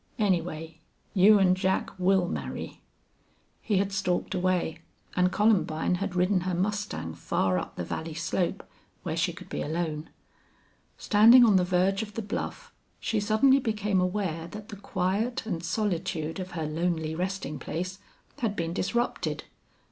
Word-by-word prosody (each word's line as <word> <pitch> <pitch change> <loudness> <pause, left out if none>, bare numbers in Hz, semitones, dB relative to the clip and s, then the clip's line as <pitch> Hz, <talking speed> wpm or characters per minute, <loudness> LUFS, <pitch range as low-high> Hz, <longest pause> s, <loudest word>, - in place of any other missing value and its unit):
Anyway, 165 -5 -1 0.3
you 205 +2 +7
an' 190 -2 +5
Jack 190 0 0
will 185 0 +3
marry." - - -5 0.8
He 205 - +1
had 200 +1 +1
stalked 195 -3 -1
away 180 -3 0 0.4
and 180 0 +3
Columbine 190 -6 +2
had 200 -2 -2
ridden 180 +2 +3
her 180 0 -1
mustang 200 - -2
far 90 +2 0
up - - -7
the 90 - -3
valley 160 - -5
slope 175 +3 -2 0.4
where 160 -3 -2
she 165 +1 +1
could 185 +2 -11
be - - -4
alone. 155 0 -3 0.9
Standing 230 +4 +7
on 215 -4 +5
the 185 - +5
verge 185 +2 +2
of 210 -1 -7
the 225 - -3
bluff, 205 - -5 0.3
she 225 - 0
suddenly 220 +6 +4
became 210 -5 0
aware 180 -3 -1
that 210 +3 -9
the 210 - -7
quiet 200 +5 -1
and 175 -6 -3
solitude 170 -4 -2
of 185 0 -6
her 160 -2 -2
lonely 160 0 -1
resting 180 -3 -3
place 185 +3 -4 0.4
had 220 -4 -1
been 165 -2 -2
disrupted. 235 +6 -1
185 Hz, 150 wpm, -28 LUFS, 170-205 Hz, 0.9 s, you